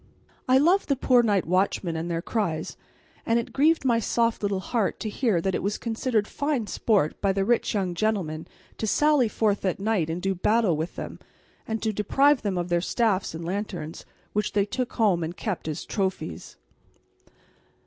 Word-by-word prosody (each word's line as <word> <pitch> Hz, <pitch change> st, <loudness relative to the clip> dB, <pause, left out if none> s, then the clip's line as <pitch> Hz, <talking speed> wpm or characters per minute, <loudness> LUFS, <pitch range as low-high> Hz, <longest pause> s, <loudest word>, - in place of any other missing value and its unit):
I 260 Hz, -, +6 dB
loved 345 Hz, +8 st, +3 dB
the 280 Hz, -, +3 dB
poor 250 Hz, -1 st, +4 dB
night 205 Hz, -5 st, +1 dB
watchmen 185 Hz, -1 st, 0 dB
and 165 Hz, +2 st, -3 dB
their 170 Hz, 0 st, -2 dB
cries, 170 Hz, -9 st, -2 dB, 0.5 s
and 230 Hz, -, +2 dB
it 235 Hz, -, -3 dB
grieved 310 Hz, +1 st, +3 dB
my 235 Hz, -3 st, +4 dB
little -, -, 0 dB
soft 230 Hz, -1 st, 0 dB
heart 200 Hz, +2 st, -1 dB
to 215 Hz, -, -3 dB
hear 215 Hz, -4 st, +1 dB
that 190 Hz, +3 st, -1 dB
it -, -, -1 dB
was 205 Hz, +2 st, -1 dB
considered 225 Hz, -2 st, -1 dB
fine 285 Hz, -6 st, -1 dB
sport 205 Hz, -7 st, 0 dB
by 195 Hz, -, +2 dB
the 195 Hz, 0 st, 0 dB
rich 235 Hz, 0 st, +1 dB
young 190 Hz, -3 st, 0 dB
gentlemen 175 Hz, -6 st, -1 dB, 0.3 s
to 220 Hz, -, -1 dB
sally 295 Hz, +1 st, +3 dB
forth 215 Hz, -2 st, 0 dB
at 185 Hz, -1 st, -1 dB
night 200 Hz, -6 st, 0 dB
and 165 Hz, +2 st, -2 dB
do 195 Hz, +1 st, 0 dB
battle 210 Hz, 0 st, +2 dB
with 160 Hz, +3 st, -4 dB
them, -, -, -7 dB, 0.5 s
and 220 Hz, 0 st, -3 dB
to 220 Hz, -1 st, 0 dB
deprive 270 Hz, +8 st, +3 dB
them 200 Hz, -3 st, -1 dB
of 175 Hz, 0 st, -2 dB
their 175 Hz, 0 st, +2 dB
staffs 195 Hz, -3 st, 0 dB
and 165 Hz, +1 st, -6 dB
lanterns, 180 Hz, -4 st, -4 dB, 0.3 s
which 210 Hz, 0 st, -1 dB
they 200 Hz, -1 st, +2 dB
took 250 Hz, +4 st, -3 dB
home 200 Hz, -7 st, +2 dB
and 165 Hz, +2 st, -5 dB
kept 200 Hz, -7 st, -3 dB
as 155 Hz, -1 st, -4 dB
trophies. 185 Hz, -, -3 dB
205 Hz, 190 wpm, -26 LUFS, 180-230 Hz, 0.5 s, I